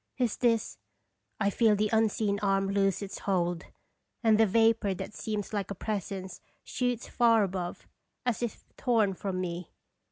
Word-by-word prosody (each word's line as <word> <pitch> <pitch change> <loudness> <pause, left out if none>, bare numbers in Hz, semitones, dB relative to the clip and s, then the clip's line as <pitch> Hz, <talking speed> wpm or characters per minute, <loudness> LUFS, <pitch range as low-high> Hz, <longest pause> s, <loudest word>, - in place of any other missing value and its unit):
Is 245 -4 0
this 230 -3 +1 0.6
I 200 -1 +2
feel 220 0 +4
the 210 +1 0
unseen 215 -2 +2
arm 195 -1 +1
loose 195 0 +1
its 195 - -6
hold, 175 -3 0 0.6
and 220 -1 +5
the 225 - +6
vapor 225 -1 +3
that 200 - -6
seems 210 -1 -4
like 200 -2 -2
a 200 - -4
presence 195 -2 -4 0.2
shoots 245 -2 -2
far 230 -3 +4
above, 185 -2 -4 0.4
as 245 -2 0
if 240 -2 -4
torn 225 -6 +2
from 185 0 -3
me. 175 -1 -4
205 Hz, 155 wpm, -29 LUFS, 195-225 Hz, 0.6 s, the